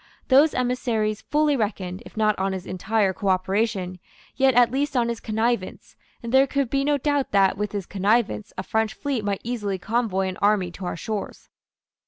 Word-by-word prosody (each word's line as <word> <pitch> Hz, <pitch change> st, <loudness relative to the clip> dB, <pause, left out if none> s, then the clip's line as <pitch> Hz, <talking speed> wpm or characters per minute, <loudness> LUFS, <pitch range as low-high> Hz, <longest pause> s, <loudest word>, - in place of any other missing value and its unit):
Those 285 Hz, +4 st, +5 dB
emissaries 235 Hz, -4 st, 0 dB
fully 300 Hz, -1 st, +1 dB
reckoned, 200 Hz, -5 st, -3 dB
if -, -, -17 dB
not 215 Hz, -1 st, +3 dB
on 190 Hz, 0 st, 0 dB
his 185 Hz, -1 st, -5 dB
entire 195 Hz, +2 st, 0 dB
cooperation, 190 Hz, 0 st, -1 dB, 0.4 s
yet 265 Hz, -2 st, +3 dB
at 240 Hz, -1 st, +5 dB
least 280 Hz, +1 st, -1 dB
on 235 Hz, -1 st, +2 dB
his 235 Hz, -1 st, -3 dB
connivance; 220 Hz, -2 st, -2 dB, 0.3 s
and 230 Hz, -, -5 dB
there 265 Hz, +1 st, +6 dB
could 275 Hz, -3 st, -1 dB
be 275 Hz, 0 st, +1 dB
no 290 Hz, 0 st, +2 dB
doubt 285 Hz, 0 st, 0 dB
that, 195 Hz, -1 st, +4 dB
with 210 Hz, +1 st, -3 dB
his 200 Hz, -3 st, -4 dB
connivance, 200 Hz, -, 0 dB
a 185 Hz, -, -3 dB
French 220 Hz, +2 st, -1 dB
fleet 275 Hz, -6 st, -2 dB
might 200 Hz, -1 st, -2 dB
easily 210 Hz, -5 st, -2 dB
convoy 205 Hz, -2 st, -1 dB
an 185 Hz, -, -5 dB
army 200 Hz, -3 st, +2 dB
to 185 Hz, +1 st, -8 dB
our -, -, -4 dB
shores. 215 Hz, +3 st, -5 dB
215 Hz, 185 wpm, -24 LUFS, 195-245 Hz, 0.4 s, there